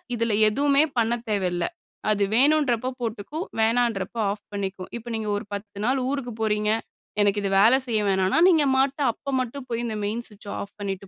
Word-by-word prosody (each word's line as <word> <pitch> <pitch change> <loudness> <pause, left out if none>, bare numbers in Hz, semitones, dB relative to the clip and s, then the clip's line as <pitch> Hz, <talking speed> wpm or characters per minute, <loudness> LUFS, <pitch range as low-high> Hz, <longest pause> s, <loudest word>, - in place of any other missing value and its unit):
இதில 230 -1 0 0.2
எதுவுமே 280 +5 +3
பண்ண 230 0 +2 0.2
தேவைல்ல. 180 -4 0 0.5
அது 205 -1 +2
வேணும்ன்றப்ப 260 -2 +3
போட்டுக்கும், 235 - -4
வேணாம்ன்றப்ப 225 -2 +1
ஆஃப் 205 0 -7
பண்ணிக்கும். 195 -2 -4
இப்ப 235 +1 -9
நீங்க 220 -1 -3
ஒரு - - -6
10 205 0 -7
நாள் 260 +3 +2
ஊருக்கு 275 -3 -3
போறீங்க. 210 -1 +1 0.5
எனக்கு 205 0 +3
இது 195 - 0
வேல 225 +6 +7
செய்ய 225 -3 +1
வேணான்னா, 190 +3 +2
நீங்க 320 -5 +4
பாட்டு 270 +2 +1
அப்ப 275 +5 -9
மட்டும் 255 +2 -5
போய், 235 0 -2
இந்த 220 - -3
மெயின் 225 +4 -2
ஸ்விட்ச்ச 210 -1 -16
ஆஃப் 200 - -9
பண்ணீட்டு 195 -1 -4
225 Hz, 175 wpm, -25 LUFS, 205-250 Hz, 0.5 s, வேல